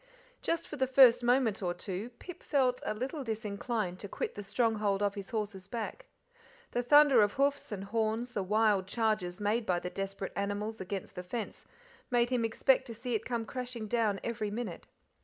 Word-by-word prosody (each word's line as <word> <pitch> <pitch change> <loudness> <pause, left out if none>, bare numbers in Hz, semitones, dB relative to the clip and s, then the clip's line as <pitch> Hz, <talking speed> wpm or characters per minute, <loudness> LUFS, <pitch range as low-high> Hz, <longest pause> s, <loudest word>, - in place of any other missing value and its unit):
Just 335 0 -1
for 300 - -7
the 260 -1 +2
first 255 -2 +7
moment 240 -3 +2
or 175 -2 -1
two 190 +5 -5
Pip 360 -1 -10
felt 255 -4 +1
a - - -2
little 270 +6 -3
disinclined 215 -3 -3
to 200 - -6
quit - - -3
the 205 - -6
stronghold 210 -1 +1
of 200 -1 +1
his 200 -2 -7
horse's 205 -4 -3
back. 235 - -5 0.6
The 245 - 0
thunder 285 -1 +7
of 205 -1 +3
hoofs 280 -1 +1
and 195 -2 -4
horns, 225 +3 -1
the 205 - -1
wild 205 -1 +2
charges 210 -5 0
made 210 +3 +1
by 180 - +2
the 180 +1 -4
desperate 195 0 -4
animals 205 +2 -2
against 190 0 -5
the 180 - -5
fence, 210 +5 -6 0.4
made 240 -1 +2
him 245 -2 +2
expect 260 +4 +2
to 230 - -7
see 245 +2 -4
it 220 - -1
come 235 -2 -2
crashing 245 -2 -5
down 215 -3 +1
every 215 -3 -2
minute. 210 -4 -5
220 Hz, 190 wpm, -32 LUFS, 200-245 Hz, 0.6 s, first